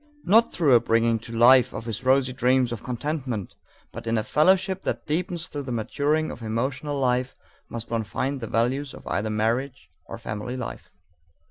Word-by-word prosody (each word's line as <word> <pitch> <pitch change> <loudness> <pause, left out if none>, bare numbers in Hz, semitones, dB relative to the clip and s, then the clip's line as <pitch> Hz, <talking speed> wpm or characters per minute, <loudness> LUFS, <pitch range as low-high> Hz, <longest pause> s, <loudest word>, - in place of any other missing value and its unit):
Not 225 +5 +4
through 150 -6 +3
a 120 - +8
bringing 115 0 +2
to 115 - -9
life 120 +2 +5
of 115 - -5
his 115 0 -4
rosy 130 0 +3
dreams 125 -1 +2
of 120 - -5
contentment, 125 - -4 0.4
but - - -8
in 115 0 +1
a 110 - 0
fellowship 190 - +2
that - - -3
deepens 170 +2 -2
through 145 -3 -6
the 130 -2 -6
maturing 145 +7 0
of - - -9
emotional 130 +6 -2
life, 125 0 0 0.3
must 115 0 -6
one 115 -1 0
find 130 +7 -3
the 115 - -4
values 130 +6 0
of - - -13
either 110 +2 -1
marriage 115 -1 -1 0.2
or - - -7
family 105 +5 -5
life. 125 - -7
125 Hz, 185 wpm, -25 LUFS, 115-145 Hz, 0.4 s, a